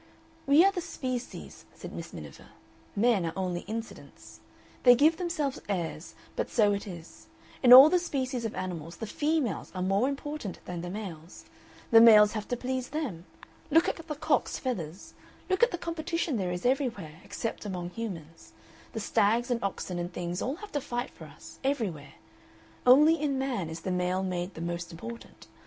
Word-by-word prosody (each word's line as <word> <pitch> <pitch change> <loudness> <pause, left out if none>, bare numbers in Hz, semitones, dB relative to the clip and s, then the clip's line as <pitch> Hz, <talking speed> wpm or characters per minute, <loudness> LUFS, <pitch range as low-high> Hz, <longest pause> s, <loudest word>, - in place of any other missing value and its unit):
"We 295 +6 +7
are 395 - +5
the 370 -2 -3
species," 255 -6 -6
said - - -9
Miss - - -7
Miniver, - - -10 0.5
"men 215 -2 +3
are 165 -1 -2
only 180 -2 -1
incidents. 225 +1 -8 0.4
They 245 -1 +8
give 310 +6 +4
themselves 310 -7 -2
airs, 170 -4 -3 0.2
but - - -2
so 210 -3 +3
it 200 +1 -4
is. 170 -3 -10 0.3
In 245 - +5
all 260 +3 +13
the 360 +3 +3
species 260 -7 -2
of 225 - -3
animals 170 -3 -5
the 225 - -5
females 295 - -1
are 185 - -2
more 195 +7 +2
important 280 -6 -5
than 175 -1 -5
the 175 - -5
males; 180 -5 -8 0.5
the 225 -1 +9
males 210 -2 +8
have 215 -2 -5
to 245 - -2
please 255 0 -3
them. 255 - -4 0.4
Look 325 +3 +4
at - - -1
the 325 -2 -6
cock's 290 - 0
feathers, 185 - -5 0.4
look 375 - +1
at 480 - +6
the 350 - -4
competition 335 -4 -2
there 185 -3 -1
is 180 +3 -5
everywhere, 230 - -1
except 225 - -5
among 180 -4 -5
humans. 170 -8 -7 0.4
The 225 - -3
stags 230 +4 +1
and 235 -2 -1
oxen 185 -2 -3
and 175 +1 -4
things 175 0 -4
all 265 - -2
have 415 +4 -11
to 290 - -1
fight 245 +1 -4
for - - -12
us, - - -14
everywhere. 220 - -2 0.7
Only 300 +5 +7
in 285 -3 0
man 250 -11 -2
is 160 +1 -7
the 185 - -3
male 180 +1 0
made 180 0 -3
the 160 - -7
most 170 0 -4
important. 230 +8 -10
225 Hz, 180 wpm, -29 LUFS, 180-275 Hz, 0.7 s, all